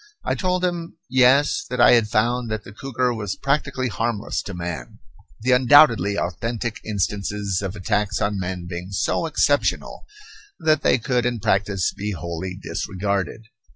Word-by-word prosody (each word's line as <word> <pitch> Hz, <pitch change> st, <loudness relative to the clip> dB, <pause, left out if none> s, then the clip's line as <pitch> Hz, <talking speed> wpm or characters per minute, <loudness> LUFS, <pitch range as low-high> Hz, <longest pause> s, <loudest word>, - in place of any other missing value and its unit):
I -, -, +1 dB
told 180 Hz, -1 st, 0 dB
him, 170 Hz, -2 st, -4 dB
Yes, 130 Hz, -, +4 dB
that -, -, -3 dB
I -, -, +7 dB
had 115 Hz, -3 st, +4 dB
found 120 Hz, +2 st, 0 dB
that 110 Hz, -1 st, -3 dB
the 95 Hz, -, -11 dB
cougar 125 Hz, +1 st, -1 dB
was 105 Hz, -4 st, -4 dB
practically 140 Hz, -2 st, -1 dB
harmless 115 Hz, -2 st, -2 dB
to 100 Hz, -, -7 dB
man, 85 Hz, -7 st, -6 dB, 0.4 s
the 125 Hz, +3 st, +1 dB
undoubtedly 125 Hz, -, +5 dB
authentic 115 Hz, +6 st, -3 dB
instances 100 Hz, -1 st, -2 dB
of 95 Hz, 0 st, -4 dB
attacks 100 Hz, 0 st, -1 dB
on 100 Hz, -1 st, -1 dB
men 90 Hz, -1 st, -4 dB
being 90 Hz, +1 st, -6 dB
so 100 Hz, -, 0 dB
exceptional 145 Hz, -2 st, 0 dB, 0.5 s
that 155 Hz, -3 st, +2 dB
they -, -, +3 dB
could 125 Hz, +1 st, 0 dB
in 120 Hz, -2 st, -2 dB
practice 100 Hz, -1 st, 0 dB
be 105 Hz, +1 st, -4 dB
wholly 85 Hz, +2 st, -5 dB
disregarded. 100 Hz, +3 st, -3 dB
105 Hz, 155 wpm, -22 LUFS, 95-125 Hz, 0.5 s, I